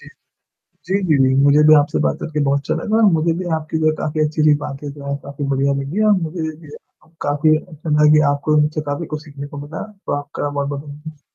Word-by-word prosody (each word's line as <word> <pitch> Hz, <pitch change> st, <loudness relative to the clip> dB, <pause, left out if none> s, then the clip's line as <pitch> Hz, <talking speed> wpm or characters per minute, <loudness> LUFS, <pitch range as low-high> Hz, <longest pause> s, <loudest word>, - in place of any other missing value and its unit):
जी। -, -, -14 dB, 0.8 s
जी, 190 Hz, -, -2 dB
जी, 155 Hz, -, +4 dB
जी। 130 Hz, 0 st, +2 dB
मुझे 145 Hz, +2 st, +5 dB
भी 155 Hz, -, +9 dB
आपसे 145 Hz, -, -1 dB
बात 70 Hz, -, 0 dB
करके 155 Hz, -1 st, -3 dB
बहुत 140 Hz, 0 st, +2 dB
अच्छा 140 Hz, -, -2 dB
लगा 210 Hz, +7 st, -1 dB
और 225 Hz, -, +3 dB
मुझे 165 Hz, +1 st, +2 dB
भी 185 Hz, -, -4 dB
आपकी 160 Hz, 0 st, -4 dB
जो 155 Hz, -, 0 dB
है 155 Hz, -, +4 dB
काफ़ी 155 Hz, 0 st, -2 dB
अच्छी-अच्छी 155 Hz, 0 st, +3 dB
बातें 140 Hz, +1 st, -6 dB
जो 140 Hz, 0 st, -11 dB
हैं, 140 Hz, -, -1 dB
काफ़ी 140 Hz, +1 st, -5 dB
बढ़िया 140 Hz, +1 st, +1 dB
लगी 150 Hz, +10 st, -2 dB
और -, -, +6 dB
मुझे 165 Hz, +1 st, -4 dB
ये 155 Hz, -1 st, -4 dB
भी 150 Hz, -, -12 dB, 0.6 s
काफ़ी 150 Hz, +2 st, +3 dB
अच्छा 155 Hz, -1 st, -7 dB
लगा 150 Hz, 0 st, +5 dB
कि 155 Hz, -, +6 dB
आपको 145 Hz, +2 st, 0 dB
उनसे 150 Hz, +1 st, +1 dB
काफ़ी 145 Hz, +4 st, -3 dB
कुछ 150 Hz, -, -5 dB
सीखने 145 Hz, -2 st, -8 dB
को 145 Hz, 0 st, -9 dB
मिला। 150 Hz, -, -6 dB
तो 200 Hz, -1 st, -7 dB
आपका 145 Hz, 0 st, -5 dB
बहुत-बहुत 140 Hz, 0 st, -3 dB
धन्यवाद। 150 Hz, +1 st, -11 dB
150 Hz, 240 wpm, -19 LUFS, 145-155 Hz, 0.8 s, भी